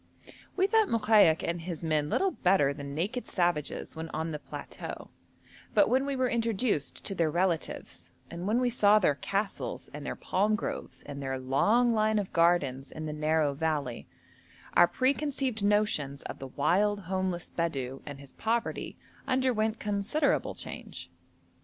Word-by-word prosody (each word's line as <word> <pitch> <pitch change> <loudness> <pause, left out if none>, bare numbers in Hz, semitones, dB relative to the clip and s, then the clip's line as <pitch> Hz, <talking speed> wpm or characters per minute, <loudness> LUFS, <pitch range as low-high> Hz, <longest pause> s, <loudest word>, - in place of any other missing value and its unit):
We 380 - +4
thought 440 +1 +3
Mokaik 210 -7 +4
and 170 0 -2
his 170 -1 -6
men 155 -2 +1
little 390 - +2
better 180 - +3
than 140 0 -7
naked 210 +10 -2
savages 175 -6 -1
when 160 0 -5
on 160 +1 -3
the 150 - -4
plateau, - - -8 0.6
but - - +5
when 265 +2 +2
we 280 - -1
were 255 -1 +1
introduced 230 - -1
to - - -1
their 165 -4 +1
relatives, 170 +1 -2 0.2
and 175 +2 -5
when 225 +4 +2
we 250 -1 +1
saw 210 -3 +5
their 180 -8 +3
castles 195 +9 -3
and - - -7
their - - -4
palm 205 +3 +1
groves - - -5
and 140 -1 -7
their 135 -1 -2
long 210 - +3
line 215 0 +2
of 200 -2 -2
gardens 150 -6 +2
in 155 - -6
the 155 - -3
narrow 155 -1 +1
valley, 145 -5 -2 0.7
our 175 - +7
preconceived 265 - 0
notions 200 -10 +1
of - - -7
the 135 - -6
wild 200 +9 +1
homeless 185 -1 -2
Bedou 135 -6 -2
and 145 -2 -8
his 140 -1 -13
poverty 230 +1 -2 0.3
underwent 245 -4 +1
considerable 210 +9 0
change. - - -8
185 Hz, 160 wpm, -29 LUFS, 150-220 Hz, 0.7 s, our